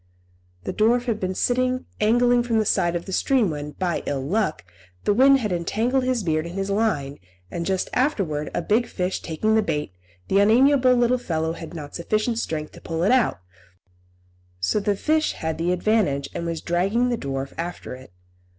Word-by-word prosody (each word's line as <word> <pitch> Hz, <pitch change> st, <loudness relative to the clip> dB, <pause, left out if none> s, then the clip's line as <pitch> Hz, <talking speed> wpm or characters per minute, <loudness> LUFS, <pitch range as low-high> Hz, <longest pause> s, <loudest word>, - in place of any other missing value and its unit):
The -, -, -4 dB
dwarf 240 Hz, +3 st, +2 dB
had 230 Hz, -4 st, -1 dB
been 185 Hz, 0 st, -2 dB
sitting 255 Hz, +3 st, 0 dB
angling 240 Hz, +3 st, +4 dB
from 235 Hz, -2 st, 0 dB
the 215 Hz, -, +2 dB
side 175 Hz, -3 st, +1 dB
of 170 Hz, -, -3 dB
the 190 Hz, -, -7 dB
stream 240 Hz, -4 st, +2 dB
when, 150 Hz, 0 st, -6 dB
by 175 Hz, +1 st, -2 dB
ill 135 Hz, -2 st, -2 dB
luck, 195 Hz, -, -1 dB, 0.4 s
the 205 Hz, -, +2 dB
wind 270 Hz, +5 st, +6 dB
had 210 Hz, -4 st, -2 dB
entangled 225 Hz, +9 st, 0 dB
his 255 Hz, -4 st, 0 dB
beard 155 Hz, -1 st, 0 dB
in 170 Hz, -, -8 dB
his 195 Hz, +1 st, -2 dB
line, 190 Hz, -10 st, 0 dB, 0.3 s
and 170 Hz, -1 st, -3 dB
just 190 Hz, -1 st, 0 dB
afterwards 190 Hz, -, 0 dB
a 175 Hz, -, -1 dB
big 225 Hz, +6 st, +2 dB
fish 180 Hz, 0 st, -2 dB
taking 180 Hz, +7 st, -1 dB
the 220 Hz, -, +4 dB
bait, 150 Hz, -, -2 dB, 0.4 s
the 195 Hz, -, +3 dB
unamiable 255 Hz, +4 st, +5 dB
little 245 Hz, +1 st, +2 dB
fellow 160 Hz, -7 st, -2 dB
had 165 Hz, 0 st, -9 dB
not 145 Hz, -3 st, -8 dB
sufficient 215 Hz, +6 st, -1 dB
strength 155 Hz, -7 st, -3 dB
to -, -, -14 dB
pull 165 Hz, 0 st, -3 dB
it 195 Hz, -, +3 dB
out; 240 Hz, -, +2 dB, 1.2 s
so 90 Hz, -, +1 dB
the 205 Hz, 0 st, 0 dB
fish 310 Hz, +8 st, +1 dB
had 160 Hz, 0 st, -4 dB
the 170 Hz, +2 st, +1 dB
advantage, 180 Hz, -8 st, +1 dB
and 170 Hz, -, -4 dB
was 165 Hz, -1 st, -3 dB
dragging 195 Hz, +8 st, +1 dB
the 240 Hz, -, +1 dB
dwarf 135 Hz, -4 st, -4 dB
after 170 Hz, -4 st, -5 dB
it. 130 Hz, -6 st, -12 dB
195 Hz, 190 wpm, -23 LUFS, 165-240 Hz, 1.2 s, wind